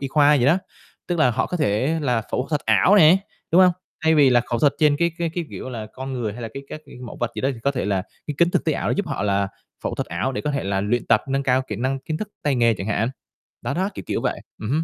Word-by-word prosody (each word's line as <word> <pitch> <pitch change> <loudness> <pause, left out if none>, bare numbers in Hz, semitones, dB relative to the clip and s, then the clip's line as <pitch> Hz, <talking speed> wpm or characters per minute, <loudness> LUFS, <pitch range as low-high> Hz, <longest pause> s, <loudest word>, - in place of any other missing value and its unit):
y 135 - -3
khoa 145 +1 +5
gì 130 -4 +2
đó. 160 +6 +5 0.5
Tức 175 -1 -1
là 130 -5 +4
họ 120 - 0
có 180 - -3
thể 140 +2 +1
là 125 -6 0
phẫu 130 - 0
thuật 150 -2 0
ảo 205 - +5
nè, 170 -2 +8 0.3
đúng 175 - +6
hông? 180 -1 +6 0.3
Thay 160 0 +5
vì 145 -4 +6
là 120 -1 +5
khẩu 120 0 -3
thuật 145 +3 +4
trên 150 -2 +4
cái 170 +1 +2
cái 170 -1 -1
cái, 175 - -2
kiểu - - -7
là, 110 -3 -5
con 130 +1 -6
người 120 -5 -2
hay 120 +3 -8
là 115 - -4
cấy 140 - -7
các 155 - -7 0.2
mẫu 120 - -8
vật 120 -2 0
gì - - -4
đó, 135 - +1
thì 115 - -12
có 140 - +2
thể 130 -3 -2
là 95 -2 0 0.2
cái 150 - -3
kính 170 0 +4
thực - - 0
tế 160 - +2
ảo - - -2
nó - - +1
giúp 200 - -1
họ - - -3
là 100 -1 +1 0.4
phẫu - - -1
thuật - - -3
ảo 90 +11 -2
để - - -3
có 150 - -2
thể 140 -1 -2
là 100 0 0
luyện 115 +4 -1
tập, 110 -2 +4
nâng 135 +1 0
cao 130 0 +2
kỹ 105 - -3
năng, 130 +4 -1
kiến 155 +3 -4
thức, 210 +5 -5
tay 145 -2 +1
nghề 115 -2 +3
chẳng 95 - -6
hạn. 110 +2 0 0.5
Đó - - -2
đó, 190 +3 0
kiểu - - -7
kiểu - - -1
vậy. - - -2 0.2
Ừm 110 - -5
hứm. 155 +3 +1
135 Hz, 305 wpm, -22 LUFS, 115-155 Hz, 0.5 s, nè